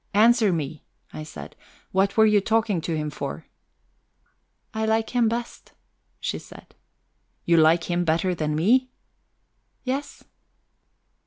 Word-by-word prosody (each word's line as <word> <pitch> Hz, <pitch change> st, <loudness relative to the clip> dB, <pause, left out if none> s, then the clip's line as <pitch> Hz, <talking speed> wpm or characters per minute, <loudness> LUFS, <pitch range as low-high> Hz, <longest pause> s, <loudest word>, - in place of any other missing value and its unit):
"Answer 225 Hz, -1 st, +5 dB
me," 155 Hz, -3 st, -3 dB, 0.3 s
I -, -, -6 dB
said. 75 Hz, -, -9 dB, 0.4 s
"What 195 Hz, +2 st, +1 dB
were 220 Hz, -, +7 dB
you 210 Hz, -1 st, +4 dB
talking 220 Hz, -4 st, +1 dB
to 160 Hz, 0 st, -2 dB
him 150 Hz, -1 st, -3 dB
for?" -, -, -6 dB, 1.3 s
"I 220 Hz, 0 st, -2 dB
like 220 Hz, 0 st, +1 dB
him 240 Hz, -3 st, +2 dB
best," 235 Hz, +1 st, -6 dB, 0.5 s
she -, -, -3 dB
said. -, -, -15 dB, 0.7 s
"You 170 Hz, 0 st, +4 dB
like 160 Hz, +1 st, +5 dB
him 175 Hz, +1 st, -1 dB
better 170 Hz, +3 st, +1 dB
than 155 Hz, -3 st, -2 dB
me?" 245 Hz, +11 st, +3 dB, 0.9 s
"Yes." 270 Hz, +3 st, -4 dB
190 Hz, 130 wpm, -24 LUFS, 160-225 Hz, 1.3 s, were